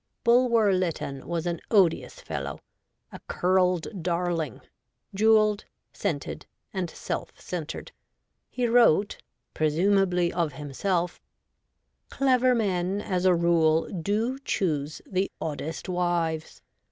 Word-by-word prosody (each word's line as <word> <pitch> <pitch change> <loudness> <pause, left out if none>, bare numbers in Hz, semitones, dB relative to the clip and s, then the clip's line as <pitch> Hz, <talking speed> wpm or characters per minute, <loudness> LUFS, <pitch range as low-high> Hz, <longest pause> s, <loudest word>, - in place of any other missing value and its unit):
Bulwer 235 -4 +4
Lytton 165 -7 -2
was 170 -1 -2
an 170 -2 -2
odious 190 -7 +2
fellow, 70 0 -5 0.5
a - - -9
' - - -45
curled 180 +1 +1
darling,' 170 - -1 0.5
jewelled, 215 0 +4 0.3
scented, - - -4 0.3
and 185 -3 -2
self - - -5
centred. 165 -4 -6 0.6
He 250 - -1
wrote, 230 -5 +4 0.3
presumably 180 +2 +2
of 170 -4 0
himself: 170 +6 -2 0.5
' - - -51
Clever 255 -2 +3
men, 190 -3 0
as 185 -3 -2
a 185 -1 +5
rule, 165 -2 +3
do 210 +8 -1
choose 155 - -2
the 190 +1 -1
oddest 160 +2 -4
wives. 175 -3 -1
180 Hz, 110 wpm, -26 LUFS, 165-205 Hz, 0.6 s, a